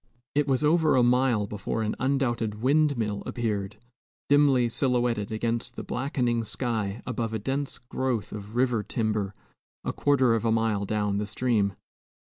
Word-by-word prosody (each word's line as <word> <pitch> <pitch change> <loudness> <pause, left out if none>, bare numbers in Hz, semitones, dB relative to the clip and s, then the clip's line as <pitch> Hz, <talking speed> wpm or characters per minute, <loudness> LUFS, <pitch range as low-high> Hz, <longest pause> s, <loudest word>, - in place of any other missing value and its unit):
It 145 0 +2
was 135 +1 +1
over 155 0 +4
a 125 - +5
mile 120 -3 +3
before 105 +2 -3
an 105 - -1
undoubted 120 -5 0
windmill 130 -6 +2
appeared, 105 -4 -2 0.5
dimly 140 -4 +5
silhouetted 120 -4 0
against 115 +1 -2
the - - -5
blackening 125 -3 -1
sky 110 -2 -2
above 115 -2 -2
a - - 0
dense 135 +6 -2
growth 125 -3 -2
of 105 +1 -8
river 125 -3 +2
timber 105 -2 -2 0.5
a - - -2
quarter 130 -4 +3
of 115 - 0
a 115 - +2
mile 110 -3 +1
down 105 -1 0
the 105 - -2
stream. 105 -3 +1
115 Hz, 150 wpm, -27 LUFS, 105-130 Hz, 0.5 s, a